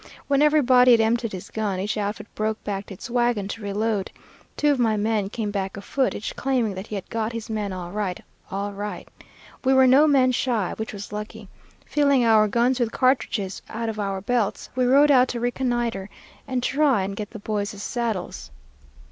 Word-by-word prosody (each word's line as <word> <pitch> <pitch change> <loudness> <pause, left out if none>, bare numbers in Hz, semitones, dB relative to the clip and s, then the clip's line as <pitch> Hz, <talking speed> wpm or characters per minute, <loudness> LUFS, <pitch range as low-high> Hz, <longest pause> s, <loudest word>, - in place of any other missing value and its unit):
When 280 0 +2
everybody 255 -5 +5
had 230 - +5
emptied 230 0 +1
his 185 -2 -8
gun, 205 -4 -2
each 205 +3 -2
outfit 205 -1 -3
broke 215 0 -2
back 200 -1 -4
to 195 - -8
its - - -8
wagon 240 -4 +1
to 230 - -6
reload. 205 0 -1 0.5
Two 295 0 +3
of 275 - 0
my 225 -3 +2
men 210 -1 0
came 215 -1 -3
back 195 -1 -3
afoot, 255 +6 -1
each 210 - -5
claiming 250 -6 0
that 190 +2 -7
he 215 - -5
had 195 - -5
got 225 0 -2
his 230 -1 -6
man 210 -2 -2
all 180 -2 -6
right, 200 -3 -2 0.3
all 200 +1 -3
right. 205 +1 -6 0.6
We 265 0 +3
were 265 0 +6
no 270 +4 +6
men 265 -3 +4
shy, 235 -6 0
which 220 - -4
was 205 0 -8
lucky. 210 -1 -7 0.4
Filling 280 -4 +3
our 220 -2 +5
guns 240 +4 +1
with 235 -2 0
cartridges 245 -7 0
out 225 +1 -3
of 215 -1 -5
our 195 -2 -2
belts, 225 0 -1
we 255 -1 +2
rode 285 +3 +6
out 255 -2 +5
to 240 - -4
reconnoitre 240 -4 -1 0.4
and 255 -1 -2
try 275 -7 +2
and 195 +1 -4
get 210 0 -5
the 225 - -9
boys' 205 -1 -3
saddles. 230 -6 -3
220 Hz, 200 wpm, -24 LUFS, 205-250 Hz, 0.6 s, were